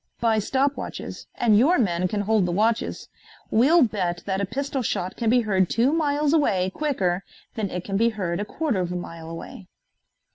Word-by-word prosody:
"By 225 -1 +2
stop 270 +6 0
watches, - - -7
and 225 -3 +3
your 315 +10 +4
men 185 -5 +1
can 205 +3 -2
hold 205 -2 +2
the - - -1
watches. 220 +5 0 0.4
We'll 285 +9 +5
bet 180 -7 -1
that 190 0 -1
a - - +1
pistol 275 +4 -2
shot 185 -5 -2
can 230 -2 0
be 245 +1 +4
heard 190 -5 +1
two 245 +6 +2
miles 300 -2 +1
away 190 - +2
quicker 195 -12 -1 0.3
than 215 -4 -2
it 180 -1 -4
can 195 0 -2
be 230 +2 +3
heard 185 -6 -3
a 205 - -2
quarter 275 -2 -2
of 180 -1 -2
a - - -3
mile 165 -2 -7
away." 165 +3 -9
215 Hz, 195 wpm, -24 LUFS, 185-260 Hz, 0.4 s, We'll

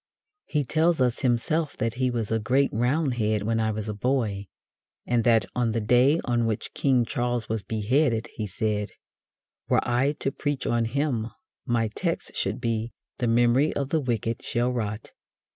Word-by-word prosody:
He 150 -3 0
tells 160 +4 +2
us 125 -2 +2
himself 140 +5 0
that 115 0 -1
he 130 +1 0
"was 115 -3 -2
a 115 - +2
great 130 +6 +2
Roundhead 120 -4 +1
when 115 +1 0
I 110 0 +1
was 110 0 -3
a 105 - -2
boy," 105 -3 -1 0.6
and 120 -1 +1
that, 115 -4 +4
on 120 -2 +1
the 115 - 0
day 125 +8 +4
on 120 -2 +1
which 110 -2 -3
King 130 -4 +2
Charles 120 -2 -1
was 110 -1 -2
beheaded, 115 +3 +1
he 110 -2 -4
said: 105 +1 -1 0.8
"Were - - +2
I 125 +4 +2
to 135 - -2
preach 145 0 -3
on 120 -1 +1
him, 125 -2 -1 0.4
my 115 -2 +1
text 110 - -3
should - - -1
be 115 0 -2 0.3
'the 120 - 0
memory 120 +5 +3
of 140 -1 -2
the 160 - +2
wicked 115 -3 -2
shall 120 +1 0
rot.'" 110 -3 -4
120 Hz, 175 wpm, -26 LUFS, 110-130 Hz, 0.8 s, that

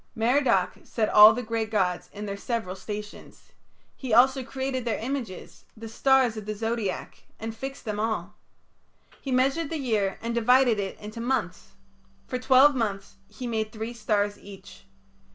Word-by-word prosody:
Merodach 245 +3 +2
set 220 -2 -1
all 210 +1 +9
the 245 +3 -3
great 225 -1 -2
gods 185 -5 -1
in 210 +1 -7
their 200 -1 -4
several 220 -3 -3
stations. 210 +1 -9 0.4
He 260 -3 -6
also 260 +2 +5
created 265 0 -3
their 230 -3 -1
images, 235 -6 -6
the 225 +1 -8
stars 260 +1 +3
of 215 -1 -7
the 215 - -3
Zodiac, 225 -2 -4
and 225 0 -5
fixed 270 +3 -7
them 210 -2 -3
all. 210 -3 -2 0.9
He 270 - -5
measured 270 +5 +1
the 325 - -3
year 220 -8 -1
and 235 +1 -4
divided 240 -1 +4
it 195 -1 -4
into 215 +2 -8
months; 230 -6 -2 0.5
for 255 - -4
twelve 265 +3 +6
months 205 -6 -3
he 215 +5 -9
made 220 -2 -2
three 220 +2 -5
stars 205 -3 -1
each. 200 0 -13
225 Hz, 160 wpm, -26 LUFS, 210-255 Hz, 0.9 s, all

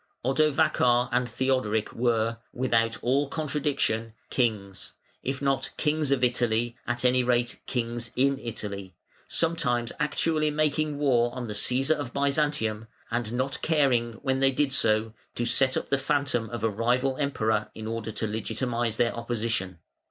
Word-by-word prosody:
Odovacar 135 -3 +3
and 125 0 +1
Theodoric 115 -3 0
were, 115 -1 +1
without 115 -2 +1
all 135 +3 +2
contradiction, 140 -7 -1 0.2
kings; 105 -6 -1 0.3
if 135 +1 -3
not 135 -1 +1
"kings 150 -1 +1
of 135 -2 +2
Italy", 120 -1 +1
at 120 +1 0
any 125 0 +4
rate 120 0 +1
"kings 120 -1 -2
in 135 +1 +2
Italy", 100 -6 -6 0.3
sometimes 135 -8 0
actually 155 0 +1
making 150 0 0
war 120 -5 +2
on 125 -1 -4
the 105 - -4
Cæsar 130 +8 +2
of 135 -4 -5
Byzantium, 140 -6 0 0.2
and 120 -2 -1
not 130 +2 -1
caring, 130 -7 +2
when 135 -2 +1
they 135 0 +4
did 135 0 +1
so, 110 -3 +2 0.2
to 120 - -1
set 130 +2 +3
up - - -4
the 140 - +3
phantom 140 -5 0
of 120 -2 -5
a 115 - +3
rival 125 +5 +1
Emperor 110 -7 0
in 110 - -7
order 115 0 -3
to 110 - -3
legitimise 115 +2 -2
their 115 0 +1
opposition. 115 -6 -2
125 Hz, 150 wpm, -27 LUFS, 115-140 Hz, 0.3 s, any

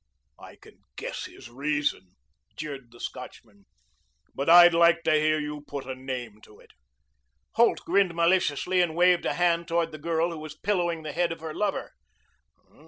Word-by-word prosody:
"I - - -13
can - - -19 0.2
guess - - -6
his - - -12
reason," 140 -9 -2 0.4
jeered 140 -5 -7
the 120 - -17
Scotchman. 105 -5 -9 0.7
"But 140 +3 -2
I'd 175 0 +9
like 170 0 +4
to - - +2
hear 155 0 +2
you 150 0 -5
put 140 -2 -6
a 130 - -5
name 130 -5 -7
to 105 - -18
it." - - -20 0.8
Holt 235 +1 +3
grinned 185 -1 +2
maliciously 180 +1 +2
and 165 -3 -1
waved 180 0 +3
a - - -1
hand 170 -1 +1
toward 165 0 0
the 155 - -9
girl 165 +2 0
who 165 - -7
was 155 0 -9
pillowing 175 -5 -1
the 155 - -5
head 175 0 0
of 165 - -7
her 160 -1 -6
lover. 205 +2 -2
160 Hz, 170 wpm, -26 LUFS, 140-175 Hz, 0.8 s, I'd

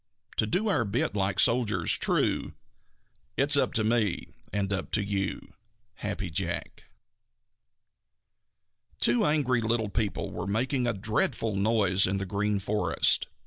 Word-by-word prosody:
To 110 - +2
do 190 - 0
our 195 - +2
bit 105 +1 -1
like 100 -1 -1
soldiers 115 -7 +3
true - - 0 0.8
It's 140 +2 +5
up 140 - +2
to 115 -4 +1
me 110 -4 0 0.2
and 100 0 -1
up 95 - -3
to 105 -2 +1
you. 100 -1 -3 0.4
Happy - - -5
Jack. - - -4 2.1
Two 120 0 +3
angry 140 -5 +2
little 110 -1 0
people 105 0 -2
were - - -5
making 125 +5 0
a 120 - +1
dreadful 105 +1 -1
noise 100 -3 +2
in 95 +1 -1
the 100 - -3
Green 100 +2 -1
Forest. 105 +2 +1
105 Hz, 135 wpm, -28 LUFS, 100-120 Hz, 2.1 s, It's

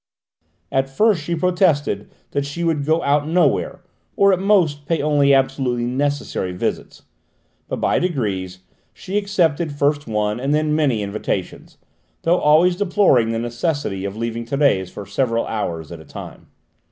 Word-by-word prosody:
At 135 0 0
first 200 +5 +2
she 170 +3 -2
protested 175 -4 +1 0.2
that 140 - -1
she 145 +5 -5
would 160 -4 0
go 160 +1 +2
out 145 +1 +1
nowhere, 180 +2 +1 0.3
or 200 0 +5
at 180 - +1
most 170 -8 +2
pay 165 - +1
only 145 -1 +3
absolutely 135 -3 +1
necessary 135 -7 -2
visits, 90 - -4 0.6
but - - -3
by - - +2
degrees 100 - -2 0.3
she 190 - -7
accepted 175 -6 +1
first 145 0 0
one 105 0 -1
and 140 +3 0
then 155 0 +1
many 135 -9 +1
invitations, 100 -2 -4 0.5
though 175 +2 +3
always 160 +4 +4
deploring 180 - +3
the 115 - -1
necessity 120 - -2
of 100 +1 -5
leaving 115 0 -3
Thérèse 115 -7 +1
for 100 - -8
several 115 +3 0
hours 85 -8 -4
at 85 - -8
a - - -12
time. - - -10
145 Hz, 155 wpm, -20 LUFS, 115-165 Hz, 0.6 s, or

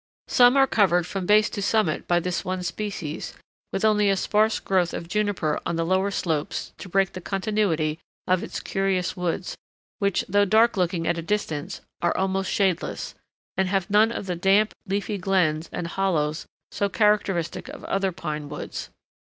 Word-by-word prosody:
Some 245 +2 +5
are 270 - +7
covered 185 -8 +3
from 190 -1 -4
base 210 0 +5
to 205 - -4
summit 205 -5 +1
by 175 0 +3
this 175 0 -2
one 185 0 -3
species, 180 -6 -4 0.4
with 195 - 0
only 210 -1 +4
a 195 - +2
sparse 215 +3 +2
growth 185 -3 +1
of 170 - -6
juniper 205 -5 0
on 170 - -2
the 165 0 0
lower 190 +3 +2
slopes 160 -6 -2
to 185 - -8
break 195 +1 +2
the 185 - -7
continuity 190 -6 0 0.3
of 185 -1 +2
its - - -5
curious 190 -3 -1
woods, 180 +1 -2 0.4
which, 200 -2 +1
though 205 +2 +3
dark 220 +4 +4
looking 175 -3 0
at 170 0 0
a - - -3
distance, 160 -5 -3 0.2
are 175 - +1
almost 190 0 0
shadeless, 190 -4 -1 0.4
and 190 -1 +1
have 190 -1 -1
none 215 +2 +5
of 215 - -4
the 180 -2 -2
damp, 195 +5 +3
leafy 200 +1 -2
glens 175 -4 +1
and 175 - -4
hollows 170 -4 -1 0.2
so 200 - 0
characteristic 200 -6 +1
of - - -9
other 195 -1 0
pine 155 -4 -5
woods. 150 - -6
190 Hz, 175 wpm, -25 LUFS, 170-205 Hz, 0.4 s, are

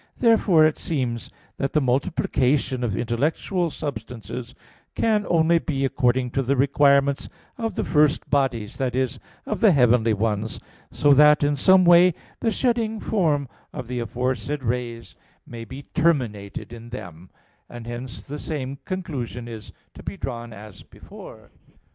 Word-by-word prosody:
2). - - -4
Therefore 195 -8 +5
it 155 - +1
seems 125 -9 -3 0.3
that 135 - -2
the 155 - +4
multiplication 135 -1 0
of 105 -6 -1
intellectual 155 - -1
substances 125 -4 -7 0.4
can 215 -2 +1
only 165 0 +4
be 135 -4 -1
according 125 -2 +1
to 135 - 0
the 135 +2 +1
requirements 140 +1 +3 0.3
of 225 -1 -2
the - - -1
first 150 -1 +2
bodies 130 -7 0
that 130 -2 -1
is, 130 -1 -1 0.3
of - - -3
the 220 -4 +6
heavenly 125 -5 +4
ones, 105 0 -2 0.3
so 145 -1 +3
that 150 +1 +6
in 145 0 +2
some 185 +6 +5
way 175 0 +6 0.2
the 230 - +1
shedding 225 -2 0
form 155 -11 0 0.3
of 125 - -6
the 125 0 -3
aforesaid 125 +4 -2
rays 120 -1 -4 0.3
may 115 -1 -8
be 130 +5 -9
terminated 115 - -1
in 115 0 -10
them; 90 -7 -9 0.4
and 120 -1 -9
hence 120 +1 -6
the 145 +2 -7
same 140 -3 -5
conclusion 140 - -5
is 110 -2 -9 0.2
to - - -12
be - - -6
drawn 120 0 -5
as 105 -2 -11
before. - - -13
135 Hz, 150 wpm, -23 LUFS, 120-155 Hz, 0.4 s, the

